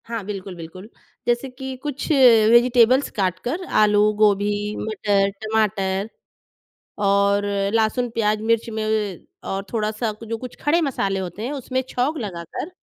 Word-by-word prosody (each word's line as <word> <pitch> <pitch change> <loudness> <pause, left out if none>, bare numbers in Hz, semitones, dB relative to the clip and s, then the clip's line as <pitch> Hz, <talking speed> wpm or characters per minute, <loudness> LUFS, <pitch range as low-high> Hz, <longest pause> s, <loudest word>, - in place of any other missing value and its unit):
हाँ। 230 -2 -4
बिल्कुल, 195 -2 -6
बिल्कुल 175 +5 -10 0.4
जैसे 240 +2 0
कि 265 +1 -7
कुछ 290 -2 -4 0.4
वेजिटेबल्स 245 +2 +5
काटकर 195 - -1 0.2
आलू, 210 -1 +4 0.2
गोभी, 205 -1 +3 0.3
मटर, 205 -2 0
टमाटर 210 -2 0 1.0
और 200 0 +3 0.3
लहसुन, 225 +2 +1
प्याज़, 215 -2 0
मिर्च 230 +1 +1
में 220 -1 -3 0.6
और 195 0 -2
थोड़ा-सा 215 0 -1
कु 215 +2 -11
जो 225 +1 -3
कुछ 250 +1 -9
खड़े 330 +4 +2
मसाले 200 -10 -1
होते 190 +4 -5
हैं 260 - -3
उसमें 260 -2 -2
छौंक 275 +6 -1
लगाकर 195 - -6
220 Hz, 135 wpm, -22 LUFS, 200-245 Hz, 1.0 s, वेजिटेबल्स